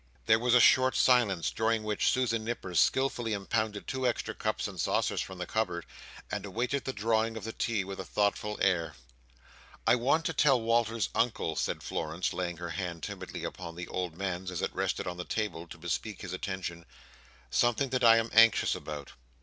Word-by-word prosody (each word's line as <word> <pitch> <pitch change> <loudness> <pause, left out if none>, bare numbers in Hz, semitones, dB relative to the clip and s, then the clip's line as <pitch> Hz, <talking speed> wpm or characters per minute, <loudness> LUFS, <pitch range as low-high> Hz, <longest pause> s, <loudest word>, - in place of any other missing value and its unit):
There 110 0 +5
was 120 +1 +3
a - - +8
short 130 +2 +5
silence; 115 -9 +3
during 110 0 0
which 105 -1 +1
Susan 115 -3 +1
Nipper 110 -5 -4
skilfully 120 +4 +2
impounded 105 +1 -2
two 130 -1 -1
extra 120 - -1
cups - - -2
and - - -5
saucers - - +1
from 95 - -7
the 90 - -4
cupboard, 85 -4 -2 0.5
and - - -3
awaited 125 +4 -2
the 135 - -1
drawing 110 0 0
of 110 - -7
the 115 - -5
tea 110 -4 -1
with 95 0 -7
a - - -3
thoughtful 105 +3 0
air. 85 -6 +1 0.9
"I - - +5
want 135 +7 +2
to 165 - 0
tell 140 -3 +4
Walter's 115 -1 +1
Uncle," 115 -8 0
said - - -2
Florence, 80 +3 -2
laying 90 -2 -3
her 85 0 -5
hand 85 -4 -4
timidly - - -6
upon 85 -2 -6
the 90 +1 -6
old 90 -3 -3
man's 95 -1 -3
as 90 - -4
it - - -1
rested - - -1
on 90 0 -4
the 90 - -4
table, 90 -5 -3
to - - -10
bespeak 105 -3 -4
his 95 -2 -5
attention, 90 -3 -5 0.6
"something 120 - +2
that 130 0 -1
I 115 -1 +8
am 115 0 0
anxious 115 0 +6
about. 75 -2 -6
110 Hz, 190 wpm, -30 LUFS, 90-115 Hz, 0.9 s, a